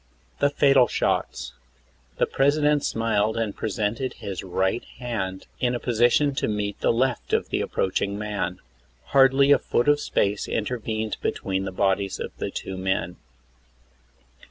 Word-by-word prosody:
THE 145 - +4
FATAL 135 -3 +4
SHOTS. 60 - -1 0.6
The - - +3
President 145 +1 +2
smiled 110 -1 0
and 110 -3 -1
presented 110 +4 -2
his 95 -3 -6
right 95 +4 0
hand 100 -7 -4
in 125 0 +1
a - - -2
position 120 +5 +3
to - - +1
meet 105 -1 -2
the - - +2
left 125 +2 -1
of - - +1
the - - 0
approaching 100 +1 -1
man. 100 -4 -3 0.5
Hardly 135 +1 +6
a 145 - +6
foot 120 - 0
of 145 0 +4
space 100 -7 0
intervened 110 -1 -2
between 95 0 -2
the 95 - -4
bodies 95 +1 0
of - - -6
the - - -3
two 95 - -6
men. 95 -2 -1
110 Hz, 145 wpm, -25 LUFS, 100-130 Hz, 0.6 s, Hardly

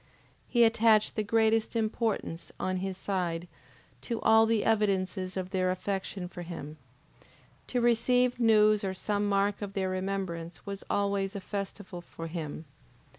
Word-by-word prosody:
He 240 -1 +4
attached 225 -1 +4
the 215 - +1
greatest 220 +1 +2
importance, 220 -6 -1
on 185 0 -1
his 190 0 -3
side, 180 -3 -2 0.5
to 235 -2 -3
all 220 0 +6
the 225 -2 +1
evidences 190 -3 0
of 185 0 -4
their 185 -2 +1
affection 190 0 -3
for 175 0 -9
him. 165 -3 -7 0.9
To 245 - 0
receive 245 +1 +3
news 215 -2 +5
or 190 -1 -2
some 205 +2 -1
mark 200 +1 +1
of 200 -1 -5
their 190 -1 -1
remembrance, 185 -3 -4
was 200 -1 -6
always 200 0 0
a - - -2
festival 195 -2 -6
for 165 -1 -9
him. 160 -1 -5
200 Hz, 145 wpm, -29 LUFS, 185-220 Hz, 0.9 s, all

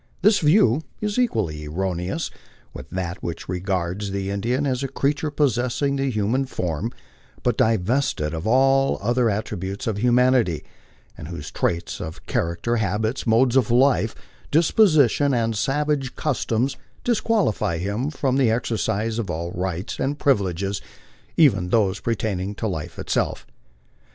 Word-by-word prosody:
This 210 +1 +5
view 150 - +4 0.2
is 210 +2 -1
equally 90 - 0
erroneous 90 - -2 0.4
with 65 - -9
that 90 0 -4
which 85 - -5
regards 90 +1 -2
the 100 0 -3
Indian 120 +8 0
as 130 -2 0
a 135 - -1
creature 145 +3 -1
possessing 140 -1 +1
the 135 0 0
human 115 +4 0
form 90 - -3 0.5
but - - +2
divested 110 - +1
of 80 +5 -4
all 135 +3 +4
other 120 +2 +2
at 105 +1 -1
tributes 95 0 -5
of 110 -3 -1
humanity, 125 - +3 0.5
and 75 - -9
whose 80 -4 -7
traits 85 0 -2
of 80 - -7
character, 85 +8 -1
habits, 110 +4 -1
modes 120 +3 +4
of 130 -5 +3
life, 125 -2 +3 0.3
dis 160 +2 +3
position, 145 - +4
and 115 -1 0
savage 140 +2 0
customs 130 -3 -1 0.3
disqualify 215 - +1
him 100 - -2
from 135 -3 0
the 130 -4 +4
exercise 115 -1 -1
of 110 - -3
all 85 +2 -3
rights 90 +2 -3
and 140 +2 -1
privileges, 100 - 0 0.6
even 100 - +4
those 100 -2 +2
pertaining 105 -4 -2
to 115 - -4
life 80 -7 -5
itself. - - -1
115 Hz, 140 wpm, -23 LUFS, 95-135 Hz, 0.6 s, This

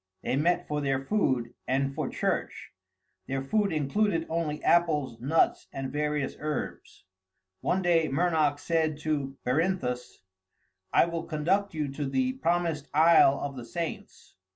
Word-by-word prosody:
They - - 0
met 175 +5 +1
for 150 0 -2
their 135 -1 -1
food 130 - 0
and 135 +1 0
for 150 -1 -3
church; - - -2 0.6
their 135 0 -2
food 205 +8 +1
included 165 +4 +1
only 160 -2 -2
apples, 150 -8 +2
nuts, 145 +7 +1
and 135 -1 -5
various 150 -1 -1
herbs. 150 -9 -5 0.5
One 190 +1 0
day 165 -2 +3
Mernoc 155 -1 +2
said 160 0 0
to 140 -3 -2
Berinthus, 125 - -1 0.7
"I - - +5
will 170 -1 -4
conduct 175 +5 0
you 150 -2 -1
to 140 +1 -4
the 260 - 0
Promised 170 - -1
Isle 155 -3 +6
of 140 -1 -4
the 125 - -7
Saints." 165 +7 -6
150 Hz, 140 wpm, -28 LUFS, 135-170 Hz, 0.7 s, Isle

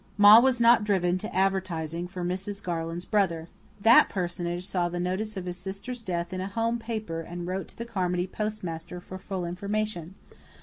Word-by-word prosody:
Ma 205 +2 +10
was 255 0 +3
not 235 -1 +6
driven 185 -4 +2
to 215 - -6
advertising 180 -3 0
for 180 0 -6
Mrs. 190 +3 -3
Garland's 170 0 -3
brother. 170 -6 0 0.3
That 225 +4 +7
personage 175 -1 -2
saw 180 -2 0
the 175 0 -4
notice 190 +4 -2
of 185 - -4
his 180 0 -4
sister's 200 +7 -5
death 175 -4 -3
in 185 - -3
a 190 - -3
home 230 +3 -1
paper 220 -8 -4
and 175 +1 -6
wrote 185 +2 -3
to - - -15
the 235 - -5
Carmody 180 -5 -1
postmaster 180 -4 -4
for 185 +1 -9
full 190 -2 -4
information. 190 -1 -3
185 Hz, 180 wpm, -27 LUFS, 175-210 Hz, 0.3 s, Ma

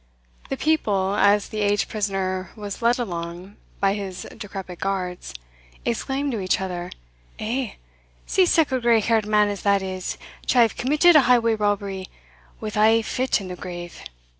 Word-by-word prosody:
The 270 - -2
people, 205 -12 +1
as 205 0 +3
the 215 - -4
aged 205 0 +2
prisoner 190 -3 -2
was 205 0 -6
led 235 +1 +3
along 175 -3 -5 0.2
by 195 0 +3
his 190 -3 -5
decrepit 190 -3 -7
guards, 185 - -3 0.5
exclaimed 270 - -1
to 225 - -2
each 185 -1 +1
other, 180 -2 -4 0.5
"Eh! 235 +2 -2 0.5
see 375 -2 +3
sic 320 -5 +3
a 260 -1 0
grey 235 -1 +4
haired 220 -1 +1
man 210 -1 +4
as 205 -1 -4
that 200 -1 +2
is, 185 -1 -4 0.3
to - - +2
have 230 -3 +5
committed 300 +6 +4
a 300 - +9
highway 230 -2 +4
robbery, 200 -3 -1 0.5
wi' 215 - -4
ae 220 +2 +4
fit 255 +2 0
in 190 - -7
the 180 - -5
grave!" 175 -1 -8
205 Hz, 165 wpm, -23 LUFS, 190-230 Hz, 0.5 s, a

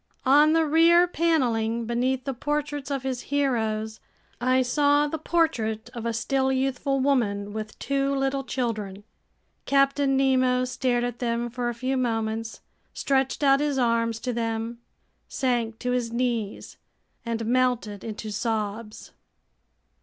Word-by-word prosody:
On 295 +4 +6
the 325 0 +3
rear 335 +3 +5
paneling, 235 -10 0
beneath 250 +3 0
the 275 - -2
portraits 290 +1 -3
of 275 -2 -2
his 260 -2 -3
heroes, 220 -6 -1 0.4
I 255 +1 +3
saw 290 +3 +3
the 315 +2 -4
portrait 245 -10 0
of 235 -2 -4
a - - 0
still 265 +3 0
youthful 270 +1 0
woman 210 -7 0
with 215 0 -6
two 275 0 0
little 270 0 -1
children. 215 -6 -3 0.6
Captain 275 0 +3
Nemo 255 -1 +2
stared 250 -1 0
at 245 -1 -3
them 235 -1 -1
for 245 0 -2
a 240 - -4
few 260 +2 -1
moments, 225 -2 -2 0.3
stretched 270 +1 0
out 275 -1 +5
his 290 -2 0
arms 230 -2 +1
to 250 0 -2
them, 230 0 -3 0.5
sank 240 -4 -1
to 250 +1 -2
his 245 -2 -1
knees, 235 -4 -2 0.5
and 230 -1 -3
melted 240 -4 0
into 215 -1 -6
sobs. 215 0 -3
250 Hz, 140 wpm, -25 LUFS, 225-275 Hz, 0.6 s, On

